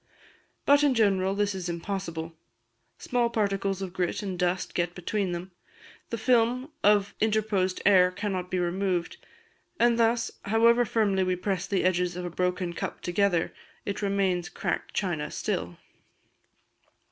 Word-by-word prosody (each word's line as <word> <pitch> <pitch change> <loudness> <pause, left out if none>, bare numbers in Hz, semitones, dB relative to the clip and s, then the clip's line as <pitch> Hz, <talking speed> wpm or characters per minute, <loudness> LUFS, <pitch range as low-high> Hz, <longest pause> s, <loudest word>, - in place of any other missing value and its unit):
But 285 +1 +6
in 280 -3 +3
general 195 -3 +2
this 205 0 +1
is 185 -2 -4
impossible: 170 -2 -4 0.6
small 240 -1 0
particles 195 -3 -1
of 185 -2 -6
grit 180 +2 -1
and 185 -3 -4
dust 180 0 0
get 175 0 -1
between 190 +1 -2
them; 175 +2 -5 0.6
the 230 - -3
film 250 +4 +2
of 205 -1 +4
interposed 210 -4 +1
air 185 -2 +6
cannot 185 -1 -3
be 185 - -1
removed; 180 0 -1 0.6
and 235 0 +4
thus, 230 0 +2
however 235 +3 +4
firmly 200 -3 +1
we 185 0 +1
press 190 0 -2
the 195 -1 0
edges 180 -1 +1
of 180 0 -4
a 175 - -4
broken 180 0 -1
cup - - -5
together, 175 -1 +1 0.3
it 200 - -3
remains 195 -3 0
cracked - - -3
china 170 -7 -1
still. 85 +1 -3
190 Hz, 145 wpm, -27 LUFS, 180-210 Hz, 0.6 s, But